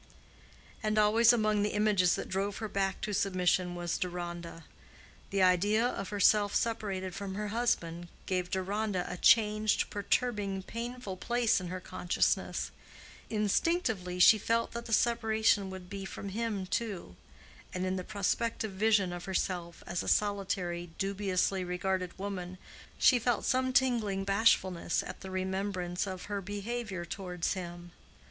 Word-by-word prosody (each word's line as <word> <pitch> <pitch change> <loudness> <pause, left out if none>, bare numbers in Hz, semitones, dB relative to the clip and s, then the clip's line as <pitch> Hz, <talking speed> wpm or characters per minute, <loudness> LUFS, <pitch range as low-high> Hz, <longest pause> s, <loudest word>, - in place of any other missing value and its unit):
And 215 -2 0
always 220 +2 +6
among 215 -3 +2
the 210 +1 0
images 205 -4 +3
that - - -5
drove 195 +2 -2
her 220 - -3
back 195 -2 -1
to 210 +1 -3
submission 180 -2 +1
was 175 -1 -2
Deronda. 175 -2 -5 0.6
The 195 -1 +2
idea 205 +5 +4
of 195 -6 -2
herself 205 0 +3
separated 195 -5 -1
from 195 0 -5
her 210 0 -3
husband, 175 -7 -1 0.2
gave 180 -1 -1
Deronda 190 0 -1
a 180 - -5
changed, 215 0 +4
perturbing, 205 -2 -1
painful 235 -3 -5
place 235 0 +1
in 180 - -5
her 185 +1 -4
consciousness: 180 0 -1 0.6
instinctively 215 - 0
she 210 +4 +7
felt 230 +2 0
that 235 0 -6
the - - -7
separation 220 -3 +2
would 185 -1 -8
be 195 +1 -6
from 195 +1 -6
him 210 -2 -2
too, 200 - -3 0.6
and 185 0 -2
in 185 0 -1
the 185 - -3
prospective 215 +2 -1
vision 200 -2 +2
of 175 0 -6
herself 180 -3 -2
as 175 - -2
a - - -7
solitary, 190 -4 0
dubiously 195 -1 0
regarded 180 0 -2
woman, 185 -2 -5 0.4
she 250 - +5
felt 240 -1 0
some 260 0 +2
tingling 235 -7 +2
bashfulness 195 -4 +2
at - - -8
the 190 - -7
remembrance 185 -1 -2
of 185 -1 -5
her 205 -1 -3
behavior 205 -1 -4
towards 180 0 -3
him. 175 -1 -7
195 Hz, 145 wpm, -31 LUFS, 180-215 Hz, 0.6 s, she